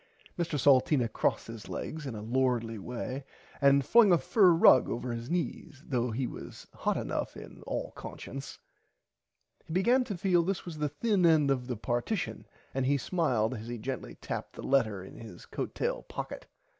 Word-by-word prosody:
Mr 165 -3 -1
Salteena 135 -1 +4
crossed 110 - 0
his 115 -1 -9
legs 155 -2 -5
in 125 - -5
a 105 - -6
lordly 120 -2 0
way 125 +5 -5 0.4
and 140 -1 +5
flung 230 -4 +6
a 175 - +7
fur 195 +2 +4
rug 165 -6 +6
over 120 +1 -3
his 115 +2 -6
knees 165 -4 -3
though 125 -3 0
he 120 +4 -1
was - - -8
hot - - -1
enough - - -3
in - - -11
all - - -3
consciunce. 135 +1 -8 1.1
He 160 - -6
began 240 +8 +4
to 200 -6 -4
feel 180 -1 +3
this 185 +2 -2
was 165 -4 -7
the 150 -1 0
thin 200 +5 +1
end 155 -4 +5
of 125 -2 -1
the 125 -3 -3
partition 120 - -2 0.3
and 130 -1 0
he 140 +1 +3
smiled 140 - 0
as 115 -2 -7
he 120 0 -4
gently 110 - -5
tapped - - -5
the - - -9
letter 110 -8 +1
in 95 - -11
his 110 -7 -11
coat - - -5
tail - - -1
pocket. - - -7
135 Hz, 180 wpm, -30 LUFS, 120-165 Hz, 1.1 s, a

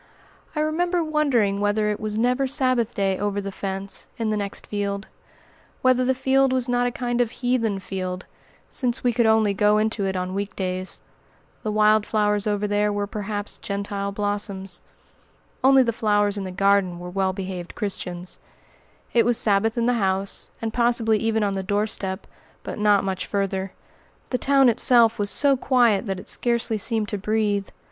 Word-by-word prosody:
I 300 - 0
remember 345 +3 0
wondering 270 -11 +1
whether 210 +1 +1
it 210 - -4
was 215 0 -3
never 250 +4 +1
Sabbath 255 -3 +1
day 195 -1 0
over 205 0 -1
the 200 0 -5
fence, 195 0 -4
in 225 -2 -1
the - - 0
next 200 -1 -5
field; 200 -1 -3 0.8
whether 255 0 +4
the 260 +1 +1
field 270 +1 +2
was 255 -1 +1
not 245 0 +1
a - - -1
kind 240 0 -1
of 240 - +1
heathen 240 -4 -1
field, 185 -1 -5 0.4
since 245 -2 -2
we 245 -1 +2
could 235 -1 +2
only 220 -2 +3
go 210 +1 +3
into 215 -2 0
it 190 - -2
on 185 0 -3
week 200 +1 -4
days. 185 -1 -4 0.6
The 215 - -2
wild 215 0 +3
flowers 210 -1 +1
over 205 0 0
there 205 0 +1
were 205 0 -1
perhaps 205 0 -5
Gentile 200 0 -3
blossoms. 200 -2 -3 0.8
Only 265 0 +6
the 230 -2 -1
flowers 205 -2 +1
in 200 -2 -3
the 185 - -5
garden 195 -1 +2
were 180 0 -8
well 190 0 0
behaved 185 -2 -6
Christians. 180 -4 -5 0.7
It 235 - +5
was 240 -1 +2
Sabbath 215 +2 +2
in 235 - +1
the 245 - +3
house, 195 0 0
and 225 -1 -2
possibly 235 -2 +2
even 225 0 0
on 200 -1 0
the 195 - -2
doorstep; 205 -1 -2 0.4
but - - -6
not 205 -1 +4
much 190 -1 -3
farther. 195 -1 -2 0.6
The 250 - 0
town 275 -1 +4
itself 235 -1 +4
was 205 0 0
so 280 +3 +5
quiet 240 -5 +2
that 195 -1 -3
it - - -12
scarcely 235 -2 0
seemed 220 +1 0
to 205 -3 -3
breathe. 205 -1 0
210 Hz, 180 wpm, -23 LUFS, 195-235 Hz, 0.8 s, Only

